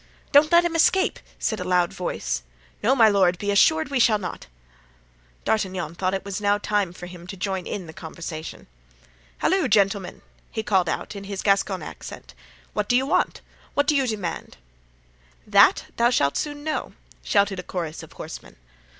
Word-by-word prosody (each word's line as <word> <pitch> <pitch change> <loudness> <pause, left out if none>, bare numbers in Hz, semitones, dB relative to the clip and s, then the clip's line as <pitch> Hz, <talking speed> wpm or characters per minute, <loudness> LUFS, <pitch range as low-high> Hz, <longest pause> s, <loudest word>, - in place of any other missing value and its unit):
"Don't 295 +2 +6
let 340 0 +6
him 335 -1 -1
escape!" 375 +4 +3 0.2
said 220 - -1
a - - -2
loud 180 -1 +1
voice. 60 - -3 0.4
"No, 260 +5 +3
my 230 -4 +7
lord; 190 -4 +3
be 205 +2 -1
assured 315 +10 +4
we 275 - +1
shall 230 -2 +5
not." 185 - -7 1.0
D'Artagnan 185 -6 -1
thought 185 +2 -1
it 190 - -5
was 200 0 -4
now 205 0 +3
time 205 -3 0
for 175 0 -9
him 175 -1 -11
to 195 - -7
join 190 -1 -3
in 190 - -4
the 160 - -10
conversation. 160 0 -7 0.7
"Halloo, 375 -6 +2
gentlemen!" 200 -3 +1 0.3
he 220 - -4
called 190 -5 +2
out - - -3
in 200 0 -7
his 195 -1 -5
Gascon 195 -3 +1
accent, - - -9 0.4
"what 210 -1 -2
do 245 - +5
you 265 - +1
want? 275 - 0 0.3
what 285 - +3
do 295 - +2
you 270 -2 +2
demand?" 205 -7 -4 0.9
"That - - +5
thou 235 +1 +4
shalt 140 - +2
soon 290 -1 -3
know," 310 0 -3 0.3
shouted 200 -2 +1
a - - -5
chorus 170 -4 -5
of - - -13
horsemen. - - -9
200 Hz, 175 wpm, -24 LUFS, 180-240 Hz, 1.0 s, my